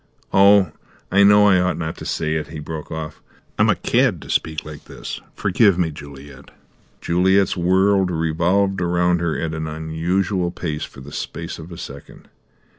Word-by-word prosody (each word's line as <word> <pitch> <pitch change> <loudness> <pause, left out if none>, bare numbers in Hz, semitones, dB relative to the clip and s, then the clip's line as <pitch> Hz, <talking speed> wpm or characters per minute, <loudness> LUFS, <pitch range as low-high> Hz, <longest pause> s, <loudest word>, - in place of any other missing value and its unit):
Oh, 100 0 +6 0.4
I 100 +2 +4
know 105 +1 +6
I 95 -2 +5
ought 90 -2 0
not 80 0 -4
to - - -8
say 80 -1 -1
it," 80 -1 -2
he 80 - -9
broke 75 +1 -7
off; 80 -1 -6 0.4
"I'm - - +4
a - - +4
cad - - +1
to - - -7
speak 80 -2 -1
like 75 -1 -10
this. - - -8
Forgive 100 -1 +3
me, 85 -3 0
Juliet." 70 -2 -12 0.5
Juliet's 95 +2 +2
world 95 +2 +2
revolved 90 +4 0
around 90 0 +1
her 85 -2 -1
at 80 -1 -3
an 80 -1 -4
unusual 85 +4 -1
pace 80 -3 -4
for 65 - -14
the 70 +2 -11
space 85 +3 -6
of 80 +2 -10
a 85 - -8
second. - - -11
85 Hz, 175 wpm, -21 LUFS, 80-95 Hz, 0.5 s, Oh